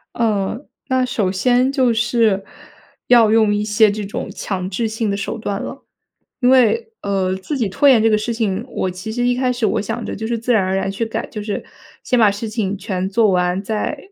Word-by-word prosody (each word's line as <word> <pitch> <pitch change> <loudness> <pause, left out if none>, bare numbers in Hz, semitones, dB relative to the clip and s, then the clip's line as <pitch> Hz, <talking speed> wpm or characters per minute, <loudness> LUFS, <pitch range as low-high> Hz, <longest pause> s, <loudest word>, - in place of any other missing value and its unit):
呃， 220 +2 -1 0.2
那 260 -1 +1
首 205 -6 -1
先 250 +6 +2
就 255 -4 +2
是， 220 -3 +1 0.6
要 230 -3 +6
用 220 -2 +4
一 205 0 0
些 210 0 +4
这 210 +1 -4
种 200 - -5
强 185 -2 -4
制 225 +4 -1
性 220 0 -2
的 200 - -1
手 200 +3 -4
段 200 -2 -3
了。 270 - -8 0.6
因 250 - +4
为， 445 - +3
呃， 190 -2 0
自 235 +10 -4
己 230 -6 0
拖 280 +9 +2
延 245 -5 +6
这 225 - +4
个 215 - +3
事 225 +3 -2
情， 220 -1 -2
我 185 - -2
其 185 +5 -6
实 245 +1 0
一 245 - +2
开 255 0 +1
始 245 -2 -1
我 205 - +1
想 225 +2 -4
着 - - -4
就 220 - -5
是 230 +1 -1
自 240 +2 0
然 215 -4 +3
而 185 0 -1
然 195 0 -1
去 205 +4 -2
改， 225 - -4
就 210 -2 -7
是 210 -1 -4 0.4
先 250 - +1
把 215 -3 +5
事 205 +3 -5
情 210 -3 -2
全 190 -1 -3
做 215 +1 +3
完 180 +1 +1
再 220 +8 -2
220 Hz, 240 characters per minute, -19 LUFS, 200-240 Hz, 0.6 s, 要